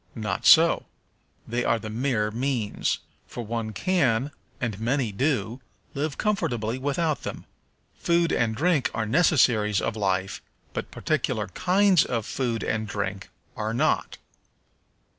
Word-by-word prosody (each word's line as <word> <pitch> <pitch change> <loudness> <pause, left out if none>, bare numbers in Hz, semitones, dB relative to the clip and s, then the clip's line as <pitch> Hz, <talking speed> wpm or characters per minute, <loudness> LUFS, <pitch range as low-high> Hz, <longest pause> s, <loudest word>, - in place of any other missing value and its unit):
Not 110 -2 -2
so; - - +6 0.6
they 120 +2 -1
are 115 - +2
the 110 -1 -7
mere 115 -3 0
means, 120 -2 -1 0.3
for 120 - -6
one 115 0 -3
can, 135 - +1 0.3
and 110 -5 -3
many 120 0 0
do, 120 0 -1 0.3
live 145 +1 -3
comfortably 125 - -1
without 145 +3 -1
them. - - -6 0.5
Food 170 -1 +1
and 110 -2 +1
drink 155 0 +2
are 110 0 -1
necessaries 115 - +3
of 115 - -2
life, 95 -2 -1 0.3
but - - -4
particular 120 -8 -1
kinds 185 - +3
of 115 -4 -2
food 120 -4 -2
and 110 0 -1
drink 100 -1 -4 0.3
are 110 +1 -3
not. - - 0
120 Hz, 130 wpm, -25 LUFS, 110-140 Hz, 0.6 s, so